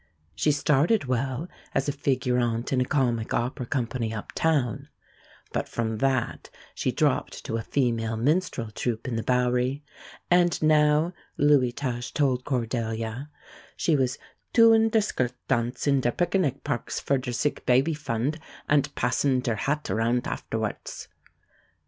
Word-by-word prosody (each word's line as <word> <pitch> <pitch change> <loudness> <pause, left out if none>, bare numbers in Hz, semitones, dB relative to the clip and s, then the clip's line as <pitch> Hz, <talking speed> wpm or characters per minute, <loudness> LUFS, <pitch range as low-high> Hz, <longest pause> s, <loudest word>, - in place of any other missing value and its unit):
She 150 - +2
started 150 +6 +2
well 130 +4 -1 0.3
as 135 - +1
a - - +2
figurante 125 -4 0
in 130 - +2
a - - +2
comic 120 -6 0
opera 125 +1 -2
company 120 -3 -2
up 110 -2 -6
town, 145 -9 0 0.7
but - - -2
from 110 -2 -2
that 130 -2 0 0.2
she - - -1
dropped - - 0
to 115 - -2
a - - -2
female 115 -3 0
minstrel 135 -3 0
troupe 115 +1 -3
in 125 - -2
the 115 - -1
Bowery, 125 +3 +1 0.5
and 175 -1 +4
now, 155 +2 +4 0.2
Lewy 145 -4 +4
Tusch 120 -2 -4
told 130 -4 +1
Cordelia, 115 0 -2 0.5
she 165 - +2
was 130 -3 +1 0.4
"tooing 225 -1 +6
ter 220 - +4
skirt 130 -11 -1
tance 120 -1 0
in 140 -2 +3
ter 120 - +2
pickernic 175 -1 0
parks 140 -5 -2
for 140 -1 +1
ter 125 -1 -4
sick 135 +5 -1
baby 130 +6 +4
fund, 145 +1 -2 0.3
ant 145 -1 +2
passin' 125 +2 +1
ter 120 - 0
hat 150 +7 -1
arount 115 +2 +1
afterwarts." - - -4
130 Hz, 145 wpm, -26 LUFS, 120-145 Hz, 0.7 s, tooing